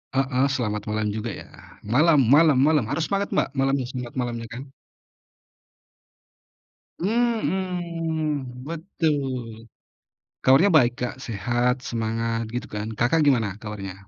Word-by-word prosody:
Heeh, 135 Hz, 0 st, +2 dB
selamat 110 Hz, -6 st, -2 dB
malam 105 Hz, 0 st, -1 dB
juga 110 Hz, +2 st, -4 dB
ya. -, -, -10 dB, 0.4 s
Malam 135 Hz, +2 st, +4 dB
malam 155 Hz, 0 st, +6 dB
malam, 150 Hz, -4 st, +3 dB
harus 145 Hz, +6 st, -1 dB
semangat 200 Hz, 0 st, +1 dB
Mbak -, -, +2 dB
malamnya, 135 Hz, -1 st, +1 dB
selamat 125 Hz, -2 st, -6 dB
malamnya 120 Hz, -2 st, -3 dB
kan. 125 Hz, +4 st, -8 dB, 2.3 s
Mhm, 170 Hz, -, -1 dB
betul. 140 Hz, -, -3 dB, 0.7 s
Kabarnya 140 Hz, +10 st, +5 dB
baik 125 Hz, -5 st, +5 dB
Kak, 125 Hz, -, -2 dB
sehat, 120 Hz, +3 st, 0 dB
semangat, 115 Hz, 0 st, -1 dB
gitu 125 Hz, -, -3 dB
kan. 105 Hz, 0 st, -3 dB
Kakak 125 Hz, +9 st, +2 dB
gimana 120 Hz, -7 st, +3 dB
kabarnya? 105 Hz, -4 st, -6 dB
130 Hz, 115 wpm, -24 LUFS, 115-155 Hz, 2.3 s, malam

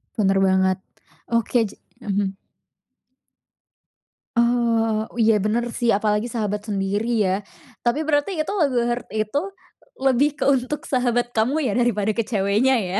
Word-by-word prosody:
Benar 195 Hz, -3 st, +2 dB
banget. 190 Hz, -1 st, +3 dB, 0.5 s
Oke 230 Hz, 0 st, +1 dB, 0.3 s
ja -, -, -12 dB
mhm. 195 Hz, -1 st, -1 dB, 2.0 s
Oh, 230 Hz, -2 st, +2 dB
oh -, -, -19 dB
iya 220 Hz, -1 st, +4 dB
benar 215 Hz, +4 st, 0 dB
sih, 235 Hz, 0 st, -1 dB
apalagi 210 Hz, +2 st, 0 dB
sahabat 210 Hz, -2 st, -3 dB
sendiri 200 Hz, +2 st, -1 dB, 0.2 s
ya, 185 Hz, -1 st, +1 dB, 0.5 s
tapi 285 Hz, +7 st, +1 dB
berarti 305 Hz, +5 st, 0 dB
lagu 310 Hz, -7 st, 0 dB
Heart 240 Hz, +1 st, -3 dB
itu 215 Hz, +6 st, 0 dB, 0.6 s
lebih 270 Hz, +2 st, +3 dB
ke -, -, -1 dB
untuk 275 Hz, +3 st, 0 dB
sahabat 245 Hz, -2 st, +1 dB
kamu 235 Hz, +7 st, +1 dB
ya -, -, -2 dB
daripada 220 Hz, -4 st, +1 dB
ke 230 Hz, -, -1 dB
ceweknya 215 Hz, +4 st, +2 dB
ya? 190 Hz, +1 st, -1 dB
225 Hz, 135 wpm, -22 LUFS, 205-245 Hz, 2.0 s, iya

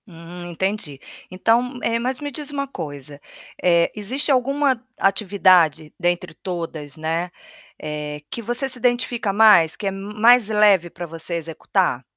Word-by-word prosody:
Hum, 175 Hz, 0 st, -10 dB
entendi. 180 Hz, -5 st, -3 dB, 0.3 s
Então, 235 Hz, +7 st, +1 dB
eh, 230 Hz, 0 st, +1 dB
mas 255 Hz, +2 st, -2 dB
me 290 Hz, -1 st, -5 dB
diz 300 Hz, 0 st, -6 dB
uma 280 Hz, -1 st, -3 dB
coisa, 145 Hz, -, -8 dB, 0.4 s
eh, 170 Hz, -1 st, +3 dB
existe 255 Hz, +8 st, -2 dB
alguma 270 Hz, -1 st, +1 dB
atividade 185 Hz, -6 st, +3 dB
dentre 175 Hz, -2 st, -1 dB
todas, 160 Hz, -5 st, -6 dB
né, 165 Hz, +3 st, -2 dB, 0.5 s
eh, 150 Hz, -1 st, -5 dB
que 235 Hz, -, -5 dB
você 240 Hz, +4 st, -2 dB
se 255 Hz, -1 st, -1 dB
identifica 240 Hz, -3 st, 0 dB
mais, 195 Hz, -6 st, +5 dB
que -, -, -8 dB
é 195 Hz, -, +1 dB
mais 210 Hz, +4 st, +3 dB
leve 205 Hz, -5 st, +4 dB
para 175 Hz, -, -7 dB
você 165 Hz, +1 st, -5 dB
executar? 165 Hz, -1 st, -1 dB
195 Hz, 145 wpm, -21 LUFS, 165-240 Hz, 0.5 s, mais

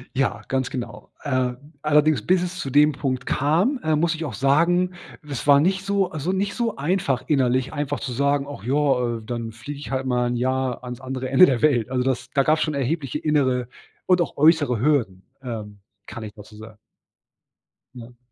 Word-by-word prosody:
Ja, 135 Hz, 0 st, 0 dB
ganz 130 Hz, -1 st, -1 dB
genau. 115 Hz, -5 st, -7 dB
Äh, 130 Hz, -3 st, 0 dB, 0.3 s
allerdings, 150 Hz, -3 st, +3 dB
bis 185 Hz, -1 st, +3 dB
es 180 Hz, +1 st, -4 dB
zu 135 Hz, -, -4 dB
dem 145 Hz, +3 st, +5 dB
Punkt 130 Hz, -3 st, -3 dB
kam, 175 Hz, -, +1 dB
äh, 155 Hz, 0 st, +2 dB
muss 165 Hz, +2 st, +1 dB
ich 160 Hz, 0 st, -5 dB
auch 135 Hz, -, -5 dB
sagen, 170 Hz, -, +2 dB, 0.3 s
das 145 Hz, -4 st, -6 dB
war 140 Hz, 0 st, +7 dB
nicht 190 Hz, +5 st, +1 dB
so 200 Hz, -2 st, 0 dB
also, 160 Hz, +1 st, -2 dB
nicht 195 Hz, +1 st, -1 dB
so 230 Hz, -3 st, -1 dB
einfach 145 Hz, -4 st, 0 dB
innerlich 130 Hz, -2 st, +1 dB
einfach 145 Hz, -1 st, -2 dB
zu 130 Hz, -, -5 dB
sagen: 140 Hz, +2 st, +1 dB
„Och 145 Hz, -8 st, -9 dB
ja, 125 Hz, -2 st, +1 dB
äh, -, -, -10 dB
dann 115 Hz, 0 st, -5 dB
fliege 125 Hz, +6 st, -8 dB
ich 145 Hz, -, -8 dB
halt 130 Hz, 0 st, -2 dB
mal 125 Hz, -1 st, +1 dB
'n 120 Hz, -, -1 dB
Jahr 130 Hz, 0 st, -1 dB
ans 125 Hz, 0 st, -7 dB
andere 130 Hz, 0 st, -4 dB
Ende 135 Hz, +7 st, +7 dB
der 130 Hz, -8 st, 0 dB
Welt.“ 130 Hz, -7 st, +2 dB
Also, 125 Hz, -1 st, 0 dB
das 130 Hz, -1 st, -2 dB
da 140 Hz, -, +3 dB
gab's 155 Hz, +2 st, +2 dB
schon 155 Hz, -, 0 dB
erhebliche 140 Hz, +1 st, -2 dB
innere 130 Hz, -5 st, +1 dB, 0.4 s
und 180 Hz, -1 st, +3 dB
auch 170 Hz, -, -3 dB
äußere 145 Hz, -6 st, +4 dB
Hürden, 120 Hz, -9 st, 0 dB, 0.2 s
ähm, 110 Hz, -5 st, -7 dB, 0.3 s
kann 115 Hz, -, -8 dB
ich 105 Hz, -1 st, -8 dB
dazu 105 Hz, 0 st, -14 dB
sagen. 110 Hz, 0 st, -12 dB, 1.2 s
Ja. 120 Hz, 0 st, -12 dB
135 Hz, 195 wpm, -23 LUFS, 125-155 Hz, 1.2 s, war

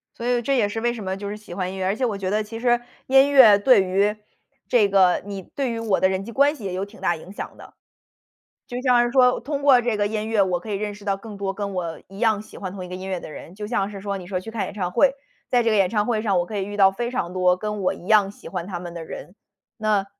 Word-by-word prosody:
所 235 Hz, -, -6 dB
以 245 Hz, 0 st, +1 dB
这 275 Hz, +4 st, 0 dB
也 215 Hz, -5 st, +2 dB
是 225 Hz, -, -3 dB
为 240 Hz, +1 st, 0 dB
什 225 Hz, -3 st, -7 dB
么 190 Hz, 0 st, -3 dB
就 200 Hz, 0 st, -5 dB
是 205 Hz, -, -4 dB
喜 210 Hz, -4 st, -11 dB
欢 185 Hz, 0 st, -3 dB
音 -, -, -7 dB
乐， 190 Hz, -, -3 dB
而 190 Hz, +1 st, +1 dB
且 255 Hz, -, 0 dB
我 215 Hz, -4 st, -2 dB
觉 190 Hz, -1 st, -3 dB
得 210 Hz, +2 st, +1 dB
其 215 Hz, +2 st, -7 dB
实 240 Hz, +1 st, +2 dB, 0.3 s
音 270 Hz, +2 st, +5 dB
乐 240 Hz, -7 st, +8 dB
对 205 Hz, -1 st, +5 dB
于 200 Hz, +3 st, +1 dB, 0.5 s
这 235 Hz, -5 st, +4 dB
个 190 Hz, -2 st, +4 dB
你 200 Hz, -1 st, -6 dB
对 265 Hz, +8 st, -4 dB
于 230 Hz, -, -3 dB
我 220 Hz, -4 st, +1 dB
的 185 Hz, -, +4 dB
人 190 Hz, 0 st, -2 dB
际 230 Hz, -, -8 dB
关 285 Hz, +5 st, +3 dB
系 245 Hz, -, -12 dB
也 190 Hz, -2 st, -3 dB
有 190 Hz, +2 st, -2 dB
挺 200 Hz, -1 st, -16 dB
大 175 Hz, -3 st, +1 dB
影 180 Hz, -, -12 dB
响 -, -, -7 dB
的。 -, -, -14 dB, 0.9 s
就 245 Hz, -1 st, -5 dB
像 250 Hz, -2 st, +4 dB
是 240 Hz, -, -1 dB
说 250 Hz, -1 st, +4 dB
通 285 Hz, 0 st, -4 dB
过 265 Hz, -4 st, +6 dB
这 235 Hz, -2 st, -1 dB
个 205 Hz, -, +1 dB
音 215 Hz, +1 st, -2 dB
乐 215 Hz, -3 st, +3 dB
我 180 Hz, -2 st, -1 dB
可 195 Hz, -, -10 dB
以 205 Hz, -, -1 dB
认 205 Hz, +1 st, -3 dB
识 205 Hz, 0 st, -13 dB
到 200 Hz, -1 st, 0 dB
更 210 Hz, 0 st, -10 dB
多 195 Hz, -1 st, -3 dB
跟 200 Hz, -1 st, -4 dB
我 170 Hz, -3 st, -4 dB
一 195 Hz, +1 st, -12 dB
样 220 Hz, -3 st, +2 dB
喜 -, -, -16 dB
欢 190 Hz, -2 st, -5 dB
同 185 Hz, -1 st, -7 dB
一 -, -, -9 dB
个 180 Hz, -, -8 dB
音 185 Hz, +1 st, -6 dB
乐 185 Hz, -2 st, -2 dB
的 155 Hz, -, -9 dB
人， 170 Hz, +3 st, -10 dB
就 210 Hz, +1 st, -6 dB
像 205 Hz, -3 st, -1 dB
是 200 Hz, -1 st, -8 dB
说 200 Hz, 0 st, -4 dB
你 180 Hz, -, -10 dB
说 185 Hz, -1 st, -2 dB
去 225 Hz, +5 st, -9 dB
看 225 Hz, -2 st, -2 dB
演 -, -, -7 dB
唱 180 Hz, -4 st, -2 dB
会。 265 Hz, +7 st, +4 dB, 0.4 s
在 245 Hz, -1 st, +3 dB
这 230 Hz, -, +2 dB
个 -, -, +2 dB
演 195 Hz, -3 st, +3 dB
唱 210 Hz, -2 st, +1 dB
会 220 Hz, -2 st, 0 dB
上 200 Hz, -4 st, +1 dB
我 175 Hz, -, 0 dB
可 215 Hz, -, -7 dB
以 -, -, -1 dB
遇 205 Hz, +1 st, -6 dB
到 195 Hz, -1 st, +6 dB
非 235 Hz, +5 st, -3 dB
常 180 Hz, -8 st, -3 dB
多 180 Hz, -1 st, +3 dB
跟 210 Hz, +1 st, -4 dB
我 185 Hz, -, +2 dB
一 -, -, -9 dB
样 210 Hz, -1 st, +4 dB
喜 200 Hz, -, -12 dB
欢 180 Hz, -2 st, -5 dB
他 180 Hz, -3 st, -5 dB
们 175 Hz, -1 st, -8 dB
的 170 Hz, -1 st, -6 dB
人， 175 Hz, -, -9 dB, 0.4 s
那 215 Hz, -3 st, +1 dB
205 Hz, 330 characters per minute, -23 LUFS, 190-230 Hz, 0.9 s, 乐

